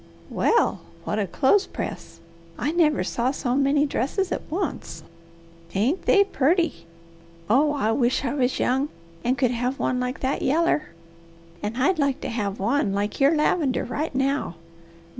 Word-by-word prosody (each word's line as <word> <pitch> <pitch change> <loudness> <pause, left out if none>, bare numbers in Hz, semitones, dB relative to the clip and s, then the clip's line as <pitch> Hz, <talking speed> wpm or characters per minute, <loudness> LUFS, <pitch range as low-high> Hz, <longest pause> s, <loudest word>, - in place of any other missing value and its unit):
Well 465 - +2 0.2
what 210 - -2
a 200 - 0
clothespress! 295 - -1 0.4
I 295 - -1
never 320 -3 +2
saw 240 +2 -1
so 255 -2 -1
many 280 +1 +3
dresses 300 - -1
at - - -1
once. 310 - -4 0.7
Ain't 250 - 0
they 400 - +6
purty? 335 - 0 0.6
Oh 290 +7 +3
I 245 -7 0
wish 245 +3 +1
I 260 - -1
was 260 -3 0
young, 265 +4 +1 0.3
and 255 +2 +1
could 250 -3 +2
have 250 +2 -1
one 250 - 0
like 250 +1 -3
that 265 +1 -1
yaller. 310 +2 +1 0.7
And 210 +3 -4
I'd 310 +7 +2
like 280 -1 +1
to - - -4
have 210 -4 -3
one 220 0 +1
like 205 +1 -2
your 280 +3 +4
lavender 300 -3 +1
right 290 +3 -3
now. 270 - 0
270 Hz, 155 wpm, -24 LUFS, 245-300 Hz, 0.7 s, they